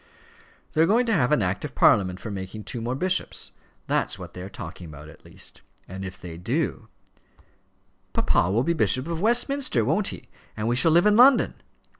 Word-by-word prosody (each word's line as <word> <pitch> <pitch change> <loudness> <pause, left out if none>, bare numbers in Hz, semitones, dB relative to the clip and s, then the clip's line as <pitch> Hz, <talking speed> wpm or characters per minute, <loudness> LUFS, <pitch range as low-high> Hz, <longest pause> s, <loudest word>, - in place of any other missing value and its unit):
"They 155 - +2
are 165 - +5
going 235 +5 +3
to 225 - +1
have 140 - +2
an 150 -8 +3
Act 90 +1 -2
of - - -6
Parliament 95 -2 +3
for 110 - -7
making 100 +2 -6
two 120 +1 -6
more 120 +3 -2
bishops. 180 +6 -1 0.3
That's - - -1
what - - -10
they 90 - -8
are 95 - -7
talking 90 -1 -9
about 75 0 -11
at 80 - -17
least. - - -9 0.3
And 95 +1 -7
if 95 0 -8
they 85 -2 -9
do 90 - -2 0.6
" - - -41
"Papa 85 - +2
will 110 +6 +1
be 170 - +1
Bishop 130 -4 +2
of 165 0 -4
Westminster 240 - +2
won't 190 - +1
he? - - -5 0.3
And 110 +1 -2
we 120 - +1
shall 160 +6 +4
live 170 +4 +4
in 210 0 +4
London?" 255 +1 +6
120 Hz, 205 wpm, -25 LUFS, -, 0.6 s, London